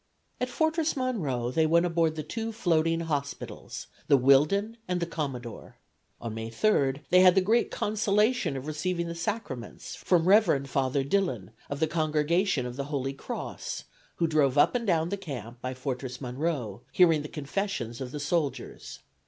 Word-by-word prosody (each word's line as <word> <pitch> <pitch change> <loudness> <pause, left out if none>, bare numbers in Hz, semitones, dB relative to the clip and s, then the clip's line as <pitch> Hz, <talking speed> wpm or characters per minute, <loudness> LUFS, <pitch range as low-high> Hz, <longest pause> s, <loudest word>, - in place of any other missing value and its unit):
At 250 - -1
Fortress 315 +3 0
Monroe 150 - -1
they 160 +4 +2
went 170 +2 +4
aboard 165 -2 +1
the 155 - -4
two 225 +8 -4
floating 165 -6 +1
hospitals, 145 -4 -4 0.2
the 140 - +6
"Whillden" 150 - +3
and 180 -1 0
the 170 - 0
"Commodore." 135 -8 -6 0.4
On 115 -2 -5
May 115 0 -5
3 140 - +1
they 180 - +7
had 185 0 +7
the - - +6
great 220 +5 +2
consolation 210 - +1
of 135 - -6
receiving 170 +3 -2
the 170 - -4
Sacraments 170 - -5
from 175 -2 +2
Rev. 185 -9 +4
Father 135 0 0
Dillon, 135 - -1 0.2
of 140 - -4
the 160 - +3
Congregation 155 0 +1
of 125 +1 -6
the 140 - -2
Holy 135 -2 -2
Cross, 240 - -5 0.3
who 170 - +1
drove 150 -4 +2
up 145 - +5
and 235 -2 -1
down 165 -2 +2
the 200 - -2
Camp 125 - -7
by 130 0 -4
Fortress 125 -1 -4
Monroe, 125 - -3
hearing 165 -4 +5
the 150 - -6
confessions 140 - -3
of 125 -1 -5
the 150 - -5
soldiers. 145 0 -3
155 Hz, 170 wpm, -28 LUFS, 135-185 Hz, 0.4 s, they